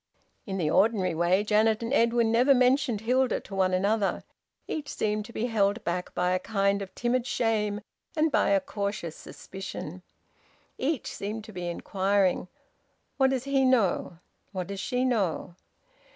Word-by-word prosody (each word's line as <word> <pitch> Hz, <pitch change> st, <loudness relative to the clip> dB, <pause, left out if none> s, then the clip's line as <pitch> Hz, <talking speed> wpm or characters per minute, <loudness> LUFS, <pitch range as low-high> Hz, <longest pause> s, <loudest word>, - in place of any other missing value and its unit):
In 195 Hz, -1 st, -3 dB
the 155 Hz, -4 st, 0 dB
ordinary 195 Hz, -4 st, +3 dB
way 175 Hz, +4 st, +2 dB
Janet 215 Hz, +1 st, +2 dB
and 230 Hz, +4 st, -2 dB
Edwin 235 Hz, -3 st, +3 dB
never 250 Hz, +4 st, +5 dB
mentioned 250 Hz, -3 st, +2 dB
Hilda 255 Hz, +2 st, +2 dB
to -, -, -12 dB
one 190 Hz, -1 st, +2 dB
another. 200 Hz, +2 st, +1 dB, 0.4 s
Each 295 Hz, -3 st, -4 dB
seemed 210 Hz, 0 st, -1 dB
to 235 Hz, -, -11 dB
be 230 Hz, -, -2 dB
held 215 Hz, -2 st, +1 dB
back 180 Hz, +1 st, -3 dB
by 180 Hz, 0 st, +1 dB
a 185 Hz, -, +2 dB
kind 200 Hz, 0 st, 0 dB
of 195 Hz, -1 st, -8 dB
timid 245 Hz, +1 st, 0 dB
shame 215 Hz, -4 st, 0 dB, 0.3 s
and 315 Hz, 0 st, +2 dB
by -, -, +3 dB
a 295 Hz, -, +4 dB
cautious 200 Hz, -, -4 dB
suspicion. 185 Hz, -2 st, -8 dB, 0.8 s
Each 280 Hz, -1 st, -1 dB
seemed 210 Hz, +2 st, -4 dB
to 220 Hz, -, -11 dB
be 180 Hz, -1 st, -4 dB
inquiring: 190 Hz, +1 st, 0 dB, 0.7 s
"What 265 Hz, -1 st, +4 dB
does 260 Hz, -2 st, -1 dB
he 275 Hz, -1 st, +2 dB
know?" 225 Hz, -9 st, +2 dB, 0.4 s
"What 185 Hz, -2 st, -3 dB
does 200 Hz, +2 st, -6 dB
she 250 Hz, +4 st, 0 dB
know?" 200 Hz, -8 st, 0 dB
210 Hz, 160 wpm, -28 LUFS, 190-245 Hz, 0.8 s, never